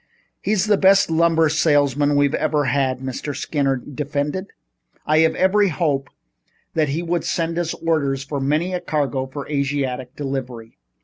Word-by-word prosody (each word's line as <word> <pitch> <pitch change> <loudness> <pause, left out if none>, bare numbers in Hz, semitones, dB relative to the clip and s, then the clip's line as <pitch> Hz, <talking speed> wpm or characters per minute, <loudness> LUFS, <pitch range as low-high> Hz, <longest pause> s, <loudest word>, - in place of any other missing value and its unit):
"He's 210 -3 +1
the 210 -2 +2
best 195 -2 +5
lumber 165 0 +3
salesman 145 -2 +2
we've 145 0 +3
ever 150 -2 +1
had," 130 0 0
Mr. 135 +2 -4
Skinner 140 -1 0
defended. 145 +7 -3 0.6
"I 155 +1 +3
had 160 0 +3
every 200 +2 +3
hope 145 -5 -1 0.6
that 155 -3 +1
he 160 +5 -2
would 170 -1 -1
send 165 0 -1
us 170 -2 -2
orders 140 -5 0
for 140 +1 -4
many 155 +7 0
a 180 - -1
cargo 140 -5 -1
for 140 +1 -7
Asiatic 140 -3 -2
delivery." 130 - -5
145 Hz, 150 wpm, -21 LUFS, 135-165 Hz, 0.6 s, best